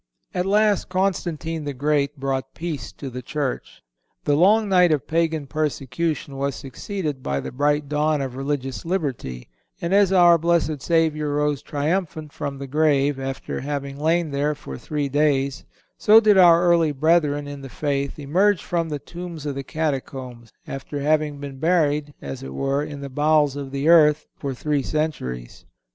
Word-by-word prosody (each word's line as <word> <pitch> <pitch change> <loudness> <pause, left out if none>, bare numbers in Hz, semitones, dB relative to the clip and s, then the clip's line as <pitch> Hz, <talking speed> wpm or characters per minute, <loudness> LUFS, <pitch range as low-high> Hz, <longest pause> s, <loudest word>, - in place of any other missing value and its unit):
At 180 +1 -1
last 210 0 +2
Constantine 170 -4 -1
the 145 -1 -4
Great 145 +1 0
brought 135 -1 -3
peace 165 -3 -5
to 135 -3 -7
the 125 +1 -6
Church. 140 +1 -4 0.4
The 145 - +2
long 205 +7 +4
night 180 -3 +4
of 150 -4 0
Pagan 160 -2 0
persecution 150 0 -2
was 140 0 -1
succeeded 150 0 -5
by 70 - -2
the - - -6
bright 145 +2 +1
dawn 150 +1 +1
of 135 -2 -4
religious 135 -1 -3
liberty, 140 - -3 0.3
and 170 +2 -2
as 200 -1 +5
our 175 -2 +6
Blessed 160 -3 +1
Savior 160 -2 +1
rose 150 -1 0
triumphant 155 0 -2
from 140 -1 -4
the 140 - -6
grave, 145 -1 +2
after 135 0 -4
having 140 0 -4
lain 160 +1 +1
there 145 +2 0
for 65 - -8
three 145 - -3
days, 140 -1 +1 0.3
so 215 +1 +7
did 215 -2 +4
our 175 -2 +7
early 170 -3 +4
brethren 145 -1 +2
in 145 -1 -7
the 135 - -8
faith 140 0 -2
emerge 180 +7 +2
from 170 -2 -1
the 150 - -2
tombs 170 +1 -8
of 145 - -2
the 135 0 -5
catacombs, 130 -6 -4
after 135 +2 -6
having 150 0 +1
been 140 -2 -8
buried, 150 -3 +1
as 70 -1 -6
it 65 0 -8
were, 135 - 0
in 145 -1 -7
the 140 - -5
bowels 150 0 +2
of 140 -1 -5
the 140 +2 -2
earth 155 -2 +6
for 140 -2 -4
three 145 +2 0
centuries. 125 - -3
150 Hz, 170 wpm, -23 LUFS, 140-165 Hz, 0.4 s, so